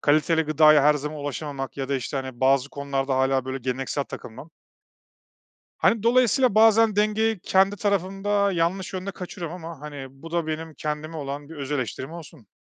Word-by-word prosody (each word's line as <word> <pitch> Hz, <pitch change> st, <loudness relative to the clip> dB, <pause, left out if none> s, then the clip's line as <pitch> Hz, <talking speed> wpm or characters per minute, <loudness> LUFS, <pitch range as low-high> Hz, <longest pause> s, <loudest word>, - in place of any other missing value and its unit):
kaliteli 155 Hz, +2 st, +3 dB
gıdaya 155 Hz, -1 st, +5 dB
her 150 Hz, +1 st, +5 dB
zaman 150 Hz, +1 st, -4 dB
ulaşamamak 145 Hz, -1 st, -5 dB
ya 135 Hz, -1 st, -4 dB
da 140 Hz, -, 0 dB
işte, 130 Hz, +2 st, -3 dB
hani, 130 Hz, -2 st, -5 dB
bazı 135 Hz, +1 st, +3 dB
konularda 135 Hz, -1 st, -2 dB
hâlâ 130 Hz, 0 st, +2 dB
böyle 130 Hz, 0 st, -4 dB
geleneksel 130 Hz, +3 st, -2 dB
takılmam 130 Hz, +7 st, -10 dB, 1.3 s
Hani, 225 Hz, -2 st, +2 dB
dolayısıyla 250 Hz, 0 st, +3 dB
bazen 225 Hz, -1 st, +5 dB
dengeyi 215 Hz, 0 st, +1 dB
kendi 190 Hz, +3 st, +2 dB
tarafımda 200 Hz, 0 st, 0 dB
yanlış 180 Hz, +2 st, -1 dB
yönde 190 Hz, +1 st, -4 dB
kaçırıyorum 180 Hz, -2 st, -7 dB
ama, 165 Hz, -4 st, -8 dB
hani, 145 Hz, -3 st, -7 dB
bu 135 Hz, +5 st, -13 dB
da 170 Hz, -2 st, -1 dB
benim 160 Hz, 0 st, -4 dB
kendime 150 Hz, +2 st, -4 dB
olan 145 Hz, 0 st, -6 dB
bir 165 Hz, -, -9 dB
öz 140 Hz, -1 st, -6 dB
eleştirim 130 Hz, +1 st, -3 dB
olsun. 160 Hz, -7 st, -11 dB
155 Hz, 165 wpm, -24 LUFS, 140-190 Hz, 1.3 s, gıdaya